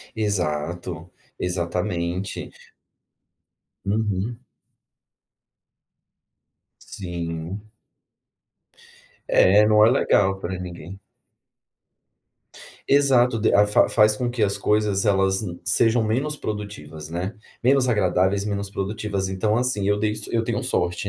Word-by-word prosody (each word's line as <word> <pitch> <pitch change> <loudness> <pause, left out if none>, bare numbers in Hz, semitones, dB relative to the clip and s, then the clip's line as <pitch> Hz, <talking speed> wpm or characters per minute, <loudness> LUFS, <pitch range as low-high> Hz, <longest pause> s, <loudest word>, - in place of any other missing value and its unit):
Exato, 90 -4 -3 0.3
exatamente. 90 +1 -3 1.4
Uhum. 105 +2 -1 2.4
Sim. 85 +2 -6 1.6
É, 105 +3 +5
não 105 0 +5
é 115 - +5
legal 95 -6 +2
para 95 +1 -4
ninguém. 90 +1 -8 1.9
Exato, 130 -4 +4
de 110 - +2 0.2
fa 105 - +4
faz 105 -1 +4
com 125 - -2
que 120 -2 -2
as 100 -1 +1
coisas 105 -2 +1
elas 95 -1 +2
n 90 -5 -6
sejam 115 +3 +3
menos 130 +8 -1
produtivas, 100 - -7
né. 90 +5 -4 0.3
Menos 130 +1 +3
agradáveis, 95 -2 +1
menos 100 -1 -3
produtivas, 100 -1 -3
então 100 +3 0
assim, 120 -5 0
eu 105 0 +2
dei 105 0 0
so - - -4
isso - - -8
eu 115 - +1
tenho 120 +2 -2
sorte 90 -6 -1
100 Hz, 105 wpm, -23 LUFS, 90-110 Hz, 2.4 s, É